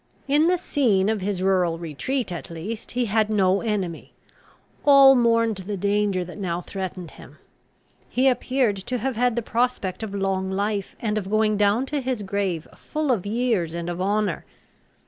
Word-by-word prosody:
In 295 +3 +3
the 360 +1 +3
scene 225 - +1
of 220 -2 -1
his 190 -1 -2
rural 180 -3 +2
retreat, 175 - -3
at 170 -6 -6
least, 185 +7 -6
he 245 0 0
had 215 0 +1
no 195 -2 +2
enemy. 195 -7 -3 0.7
All 275 -2 +8
mourned 230 -3 +2
the 195 +2 -5
danger 200 -1 0
that 180 +4 -10
now 175 -3 -2
threatened 185 -2 -6
him. - - -14 0.7
He 255 +2 +2
appeared 255 -4 +1
to 250 +6 -3
have 260 +2 -2
had 245 0 +1
the 235 - -1
prospect 230 -5 -1
of 210 -2 -5
long 190 -1 -1
life, 200 +1 -2
and 215 -2 0
of 195 -2 -7
going 215 0 +2
down 205 +5 +2
to 285 +1 -2
his 250 -4 -2
grave 190 -5 -2
full 305 -3 -2
of 205 -5 -1
years 215 -7 0
and 170 0 -3
of 175 +1 -5
honour. 205 +2 0
210 Hz, 175 wpm, -24 LUFS, 190-240 Hz, 0.7 s, All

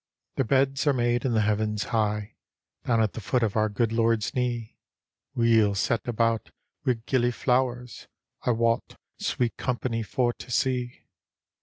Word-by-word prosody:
" - - -66
" - - -56
Their 135 - +1
beds 135 +3 +2
are 145 - +5
made 120 -1 +1
in 125 - +1
the 110 - +3
heavens 105 0 0
high, 105 -1 0 0.5
Down 115 -2 +3
at 105 - -1
the 115 - -6
foot 120 +4 0
of 105 -3 0
our 110 -1 +2
good 110 +2 0
Lord's 115 -2 +1
knee, 120 -3 -2 0.6
Weel 115 -3 +4
set 115 +4 0
about 115 -2 0 0.3
wi' 125 - +2
gillyflowers; 125 -1 0 0.4
I - - 0
wot, 115 -1 +1 0.2
sweet 120 -2 -1
company 120 -2 -2
for 120 +2 0
to - - -12
see. 125 0 -1
115 Hz, 160 wpm, -26 LUFS, 110-125 Hz, 0.6 s, are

